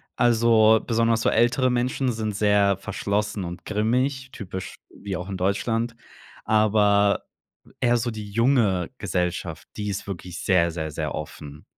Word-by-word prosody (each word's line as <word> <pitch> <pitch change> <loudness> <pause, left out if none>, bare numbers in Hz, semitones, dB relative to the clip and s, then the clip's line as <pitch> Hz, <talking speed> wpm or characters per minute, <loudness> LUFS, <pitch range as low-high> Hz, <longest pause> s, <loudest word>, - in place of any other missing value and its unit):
Also, 110 -2 +4
besonders 115 -1 +2
so - - +2
ältere 125 +2 +3
Menschen 125 +1 0
sind 110 -2 -3
sehr 100 -1 +3
verschlossen 100 0 -2
und 85 -1 -7
grimmig, 130 +6 -1
typisch, 95 -4 -7
wie 100 -2 -6
auch 90 +2 -6
in 95 - -4
Deutschland, 115 +5 -1 0.5
aber 105 -2 +3 0.5
eher 120 0 +3
so 120 +1 -1
die 105 -3 -7
junge 115 -6 +2
Gesellschaft, 90 -4 -3
die 105 -1 -3
ist 100 0 -4
wirklich 90 -2 -6
sehr, 85 -3 +3
sehr, 80 -1 -4
sehr 75 -1 -4
offen. 75 0 -8
105 Hz, 145 wpm, -24 LUFS, 95-115 Hz, 0.5 s, Also